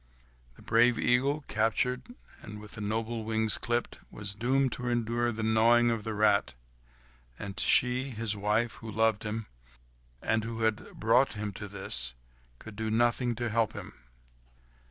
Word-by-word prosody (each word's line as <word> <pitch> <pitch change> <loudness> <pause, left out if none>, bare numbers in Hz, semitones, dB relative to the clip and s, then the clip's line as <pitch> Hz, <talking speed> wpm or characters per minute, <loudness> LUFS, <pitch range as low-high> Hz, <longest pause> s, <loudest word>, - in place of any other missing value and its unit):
The - - -16
brave 120 +1 +4
eagle, 140 +4 +1
captured, 125 - 0 0.3
and 105 0 -9
with 105 +1 -9
noble 110 +2 -2
wings 110 0 +1
clipped, 120 0 -2
was 105 -1 -4
doomed 130 +5 +1
to 125 +2 -4
endure 120 0 0
the 110 0 -4
gnawing 115 +2 +4
of 115 -2 -2
the 110 0 -4
rat. 105 -7 +2 0.8
And 100 0 -6
she, 125 +2 +2
his 110 -3 -1
wife, 105 +3 +1
who 115 - -7
loved 110 0 +2
him, 110 0 -4 0.7
and 110 +6 0
who 115 0 -5
had 110 -1 -1
brought 115 +5 +3
him 105 -1 -4
to 105 - -7
this, 65 -11 -3 0.4
could 110 - -11
do 110 +1 -3
nothing 120 +2 +2
to 120 0 -2
help 110 -1 +1
him. - - -8
110 Hz, 155 wpm, -30 LUFS, 105-120 Hz, 0.8 s, brave